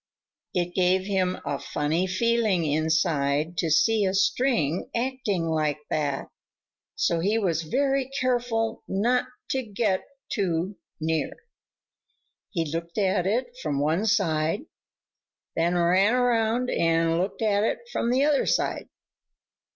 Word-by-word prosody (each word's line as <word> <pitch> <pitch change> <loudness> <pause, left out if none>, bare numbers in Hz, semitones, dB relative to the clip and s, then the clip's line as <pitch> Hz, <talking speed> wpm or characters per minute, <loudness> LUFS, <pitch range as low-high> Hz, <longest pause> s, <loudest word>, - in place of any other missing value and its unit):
It 175 -1 0
gave 185 +1 +2
him 190 -2 0
a 140 - -2
funny 160 +5 -1
feeling 215 -2 +1
inside 155 0 +1
to 165 - 0
see 220 +7 +3
a 190 0 +1
string 190 - +1
acting 235 -7 -1
like 155 -2 0
that, 145 -3 -1 0.7
so 170 - +1
he 205 +6 +1
was 175 -7 0
very 270 - 0
careful 240 -3 0
not 235 +6 +1 0.3
to 265 - +1
get 205 -4 -1 0.3
too 185 -1 -1 0.2
near. 160 -2 -1 1.2
He 165 -5 -1
looked 165 +2 -5
at 190 -3 +1
it 245 +4 -1
from 145 -3 -1
one 160 +9 +1
side, 180 - +1 0.9
then 170 +2 +1
ran 185 +6 +3
around 245 0 +1
and 165 0 +2
looked 190 +4 -2
at 205 -2 +2
it 475 - -2
from 235 - -1
the 260 +3 +3
other 295 -2 +2
side. - - 0
190 Hz, 130 wpm, -26 LUFS, 165-225 Hz, 1.2 s, see